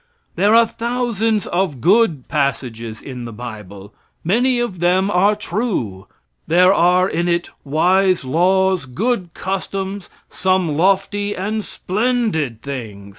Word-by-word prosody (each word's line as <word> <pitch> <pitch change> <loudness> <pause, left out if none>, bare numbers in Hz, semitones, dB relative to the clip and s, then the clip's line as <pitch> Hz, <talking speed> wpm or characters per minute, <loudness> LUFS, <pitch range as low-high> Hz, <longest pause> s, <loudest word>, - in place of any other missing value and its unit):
There 205 +5 +3
are 230 0 +7
thousands 230 -3 -1
of 175 -7 -1
good 175 - +2
passages 120 -6 -2
in 125 -3 -7
the 115 - -7
bible. 105 -4 -9 0.3
Many 245 +8 +2
of 230 -7 -3
them 185 +3 +2
are 200 +3 +3
true. 205 - -3 0.4
There 180 +3 +5
are 180 0 +3
in 175 -2 -1
it 175 0 -1
wise 180 +4 +2
laws, 185 +4 +2
good 185 - -2
customs, 195 +1 -4 0.2
some 185 -5 0
lofty 195 +4 +1
and 210 +3 -2
splendid 200 - -1
things. 110 -8 -7
185 Hz, 125 wpm, -19 LUFS, 140-205 Hz, 0.4 s, are